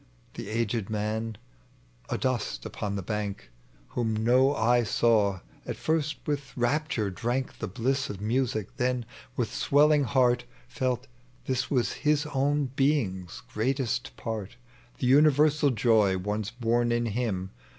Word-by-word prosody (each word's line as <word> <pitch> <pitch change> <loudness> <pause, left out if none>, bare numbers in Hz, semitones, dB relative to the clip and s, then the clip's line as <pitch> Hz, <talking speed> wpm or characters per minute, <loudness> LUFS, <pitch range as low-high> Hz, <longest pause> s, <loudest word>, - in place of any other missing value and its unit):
The - - -7
aged 115 -1 -1
man 110 +1 -2 0.7
adnsfc 130 -4 -1
upon 100 -1 -4
the 100 - -3
bank 105 - -4 0.2
— - - -30
Wliom 115 -3 0
no 130 +4 +4
eye 120 +1 +3
saw 105 -4 +2
— - - -28
at - - -3
first 155 -1 0
with 140 -4 -3
rapture 120 -4 0
drank 120 +7 -2
The - - -3
bliss 130 +7 -1
of 100 - -5
music, 115 -1 -1
then, 125 -2 0 0.3
with 120 -3 -1
swelling 145 0 +4
heart, 125 -2 +2 0.2
Felt, 130 -2 -1 0.4
thia 130 - 0
was 125 -4 +1
his 150 0 +2
own 140 0 +1
being's 110 - 0
greater 130 +5 0 0.3
part, 110 -1 -5 0.4
The - - -2
universal 150 +2 +5
joy 110 -5 +3
once 105 +2 -2
born 120 -1 +1
in 120 0 +1
him. 105 -5 -2
120 Hz, 140 wpm, -28 LUFS, 105-135 Hz, 0.7 s, universal